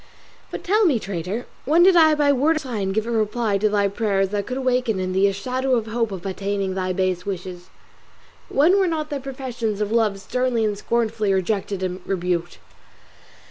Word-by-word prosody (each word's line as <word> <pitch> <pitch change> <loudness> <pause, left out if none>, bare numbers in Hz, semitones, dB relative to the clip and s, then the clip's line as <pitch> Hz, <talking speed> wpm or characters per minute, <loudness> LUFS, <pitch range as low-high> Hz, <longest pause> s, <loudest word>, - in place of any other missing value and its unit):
But - - -6
tell 425 +4 +3
me, 280 -7 +3
traitor, 195 +2 -4 0.2
when 325 +5 +4
did 375 0 +6
I 315 -2 +6
by 290 -1 +3
word 290 +5 +2
or - - 0
sign 220 -9 -3
give 220 +2 -1
a 235 - -3
reply 215 -2 0
to 215 +1 +2
thy 205 -1 +2
prayers 200 -2 0
that 200 0 -3
could 255 - -3
awaken 250 -5 0
in 185 0 -2
thee 190 +2 +4
a - - +1
shadow 255 +6 -1
of 230 -3 -1
hope 225 0 -1
of 190 -2 -7
attaining 195 0 -2
thy 185 -1 -2
base 185 -1 -1
wishes? 180 -2 -6 0.8
When 340 +8 +4
were 380 - +3
not 310 -2 -2
thy 285 - -2
professions 250 -5 -4
of 210 0 -1
love 220 -4 +1
sternly 240 +2 0
and 210 -1 0
scornfully 220 -1 0
rejected 195 0 -1
and 185 0 -3
rebuked? 175 -2 -2
215 Hz, 195 wpm, -22 LUFS, 195-255 Hz, 0.8 s, did